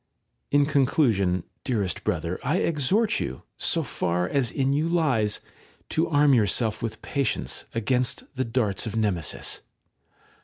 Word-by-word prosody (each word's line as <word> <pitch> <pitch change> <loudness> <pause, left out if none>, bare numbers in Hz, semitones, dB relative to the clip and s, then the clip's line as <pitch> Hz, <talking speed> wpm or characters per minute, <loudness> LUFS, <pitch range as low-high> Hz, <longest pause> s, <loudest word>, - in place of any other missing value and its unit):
§ - - -49 0.5
5. 145 - +5
In - - +3
conclusion, 125 - +2 0.2
dearest 105 -8 -1
brother, 85 +2 -2
I 145 +6 +1
exhort 170 - +1
you, 65 - -4 0.2
so - - +1
far 90 +1 -1
as 135 -1 +1
in 135 0 +1
you 155 +3 +1
lies, 130 -12 +2
3 - - -25 0.4
to 160 - +1
arm 145 -2 +4
yourself 110 -1 +2
with 110 -2 -4
patience 140 -2 -1
against 125 +2 +1
the 130 - 0
darts 115 -4 0
of 110 - -4
Nemesis. 100 -8 -1
125 Hz, 150 wpm, -25 LUFS, 105-145 Hz, 0.5 s, 5